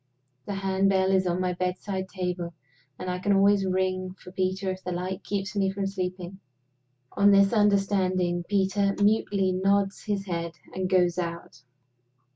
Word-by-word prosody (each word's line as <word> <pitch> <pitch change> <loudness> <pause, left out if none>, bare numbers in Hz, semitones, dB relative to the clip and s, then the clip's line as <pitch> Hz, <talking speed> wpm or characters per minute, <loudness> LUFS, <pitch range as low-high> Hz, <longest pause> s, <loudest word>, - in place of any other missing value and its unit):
The 200 - -3
hand 195 0 +1
bell 190 -1 +2
is 190 -1 +2
on 175 +1 0
my 180 -1 0
bedside 185 +1 -3
table; 180 -3 -4 0.4
and 185 - -6
I 180 0 -2
can 200 +2 +1
always 195 0 +4
ring 185 0 -1
for 180 -1 -13
Peter 190 +1 -1
if 185 0 -7
the 180 - -4
light 185 +2 -4
keeps 195 -1 -3
me 195 -1 +2
from 195 0 -3
sleeping. 185 -1 -4 0.7
On 200 0 +4
this 200 +1 +5
understanding, 190 -4 +2
Peter 200 0 +1
mutely 205 -2 +2
nods 195 +1 +1
his 200 -2 -2
head, 170 -3 -3 0.2
and 185 0 -2
goes 180 -2 +2
out. 170 -7 -5
190 Hz, 160 wpm, -26 LUFS, 180-195 Hz, 0.7 s, this